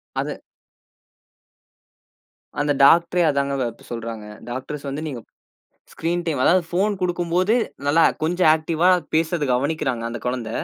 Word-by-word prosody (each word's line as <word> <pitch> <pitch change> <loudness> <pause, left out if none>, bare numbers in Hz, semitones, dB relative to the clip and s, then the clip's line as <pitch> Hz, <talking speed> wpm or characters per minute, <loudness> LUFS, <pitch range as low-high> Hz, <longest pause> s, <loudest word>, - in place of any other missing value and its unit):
அது - - -3 2.2
அந்த 145 0 +2
டாக்டரே 170 +3 +5
அதாங்க 140 -1 -1
வ - - +1
இப்ப 115 - -20
சொல்றாங்க. 115 -2 -6 0.3
டாக்டர்ஸ் 140 +3 -6
வந்து 145 +3 -4
நீங்க 130 -5 -6 0.7
ஸ்கிரீன் 175 +2 -2
டைம் 145 -6 -1
அதாவது 180 0 +4
ஃபோன் 200 +3 +1
குடுக்கும்போது 175 +2 +1 0.3
நல்லா 160 +3 +4 0.2
கொஞ்சம் 175 0 +3
ஆக்டிவா 160 +2 +1 0.3
பேசுறத 165 -1 +1
கவனிக்கிறாங்க 130 -3 -1
அந்தக் 120 -1 -7
குழந்த. 125 -3 -3
155 Hz, 125 wpm, -22 LUFS, 130-175 Hz, 2.2 s, டாக்டரே